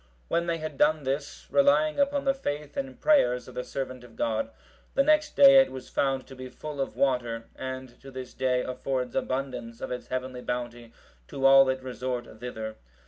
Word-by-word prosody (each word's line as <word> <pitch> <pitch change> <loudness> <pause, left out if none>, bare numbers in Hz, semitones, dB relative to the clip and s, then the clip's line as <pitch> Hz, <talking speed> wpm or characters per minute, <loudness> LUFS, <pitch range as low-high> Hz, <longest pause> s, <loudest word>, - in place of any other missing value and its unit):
When 170 0 +1
they 170 -1 0
had 155 -3 -6
done 150 0 +3
this 140 +2 -3
relying 285 +2 +4
upon 280 0 +1
the 270 - +4
faith 150 - -4
and 270 -1 -4
prayers 125 - +3
of 125 - -11
the 125 - -3
servant 130 -2 -5
of 120 -2 -15
God, 110 0 -1 0.5
the 275 - +5
next 305 +1 +3
day 275 -1 +9
it 270 - 0
was 130 -1 -8
found 135 -2 0
to 135 - -12
be 130 0 -8
full 145 +2 -6
of 135 - -3
water, 120 -4 0
and 130 -1 -7
to 135 - -11
this 130 -1 -8
day 130 -1 +1
affords 130 -1 -3
abundance 125 -3 -3
of - - -5
its 125 - -5
heavenly 130 0 -4
bounty 120 -1 -4 0.4
to 135 - -3
all 135 0 +8
that 130 0 -1
resort 125 -3 -5
thither. 110 -3 -6
130 Hz, 195 wpm, -27 LUFS, 125-150 Hz, 0.5 s, day